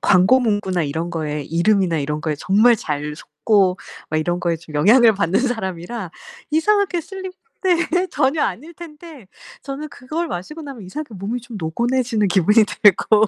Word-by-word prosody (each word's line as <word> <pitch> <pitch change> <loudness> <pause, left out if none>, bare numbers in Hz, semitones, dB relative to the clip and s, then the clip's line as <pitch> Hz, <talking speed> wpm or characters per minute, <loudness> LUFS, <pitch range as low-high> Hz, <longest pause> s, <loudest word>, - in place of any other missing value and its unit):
광고문구나 205 -2 +3
이런 160 +4 -3
거에 150 -3 -3
이름이나 170 +2 +1
이런 150 +1 -3
거에 155 0 -2
정말 205 +9 +4
잘 150 -6 -4
속고 185 +6 +1 0.3
막 155 - 0
이런 175 +3 -1
거에 170 -1 0
좀 160 -1 -14
영향을 220 - +6
받는 185 -1 +1
사람이라 210 -4 -4 0.4
이상하게 365 +3 +2
슬립 375 +2 -8 0.3
네 360 0 +1
전혀 285 +2 +1
아닐텐데 300 - -7 0.3
저는 275 +2 -6
그걸 305 +5 -5
마시고 305 - -6
나면 275 -6 -9
이상하게 235 +6 -7
몸이 205 +6 -4
좀 240 -1 -10
노곤해지는 235 +6 0
기분이 205 +4 +4
들고 210 +1 +4
210 Hz, 345 characters per minute, -20 LUFS, 175-275 Hz, 0.4 s, 영향을